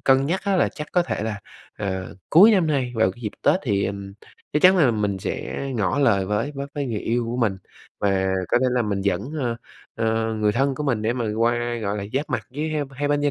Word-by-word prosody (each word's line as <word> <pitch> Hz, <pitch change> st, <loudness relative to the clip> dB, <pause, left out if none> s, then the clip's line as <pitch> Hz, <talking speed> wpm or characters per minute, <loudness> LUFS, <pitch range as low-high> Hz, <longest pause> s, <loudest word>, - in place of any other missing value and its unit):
cân 135 Hz, +1 st, +3 dB
nhắc 180 Hz, +4 st, 0 dB
á 200 Hz, -2 st, +2 dB
là -, -, +3 dB
chắc 150 Hz, -1 st, -8 dB
có 180 Hz, -, +4 dB
thể 170 Hz, -, -3 dB
là, 105 Hz, -2 st, -3 dB, 0.4 s
ờ, 95 Hz, -2 st, -4 dB
cuối 195 Hz, +8 st, +8 dB
năm 185 Hz, -5 st, +3 dB
nay 135 Hz, -5 st, 0 dB
vào 95 Hz, -4 st, +3 dB
cái 120 Hz, -, -17 dB
dịp 105 Hz, -, -3 dB
Tết -, -, +4 dB
thì, 100 Hz, -6 st, 0 dB
ừm, 100 Hz, 0 st, -5 dB, 0.4 s
chắc 150 Hz, -, +1 dB
chắn 185 Hz, +1 st, +7 dB
là 145 Hz, -8 st, +5 dB
mình 105 Hz, -3 st, -1 dB
sẽ -, -, -4 dB, 0.2 s
ngỏ 105 Hz, +6 st, 0 dB
lời 100 Hz, -9 st, +3 dB
với 110 Hz, +8 st, -1 dB
với 140 Hz, 0 st, -4 dB
với 145 Hz, -1 st, -2 dB
người 110 Hz, -5 st, -3 dB
yêu 120 Hz, +1 st, 0 dB
của 120 Hz, -, -3 dB
mình 110 Hz, -6 st, 0 dB, 0.4 s
và 95 Hz, -1 st, +1 dB, 0.2 s
có -, -, +3 dB
thể -, -, +3 dB
là 125 Hz, -1 st, +1 dB
mình 100 Hz, -2 st, -1 dB
dẫn, 100 Hz, +6 st, -1 dB
ơ, 120 Hz, -2 st, -1 dB, 0.4 s
ơ, 110 Hz, 0 st, 0 dB
người 105 Hz, -1 st, +1 dB
thân 135 Hz, +4 st, +1 dB
của 150 Hz, -, -4 dB
mình 120 Hz, -6 st, 0 dB
để 110 Hz, +2 st, +1 dB
mà 120 Hz, -2 st, -2 dB
qua, 120 Hz, +1 st, +1 dB
gọi 105 Hz, +1 st, -1 dB
là, 100 Hz, -, -4 dB
giáp 140 Hz, +3 st, -2 dB
mặt -, -, -2 dB
với 150 Hz, +4 st, -3 dB
h 155 Hz, -, -2 dB, 0.2 s
hai 145 Hz, +2 st, -2 dB
bên 145 Hz, 0 st, +2 dB
gia 145 Hz, -, +2 dB
120 Hz, 255 wpm, -23 LUFS, 105-140 Hz, 0.4 s, cuối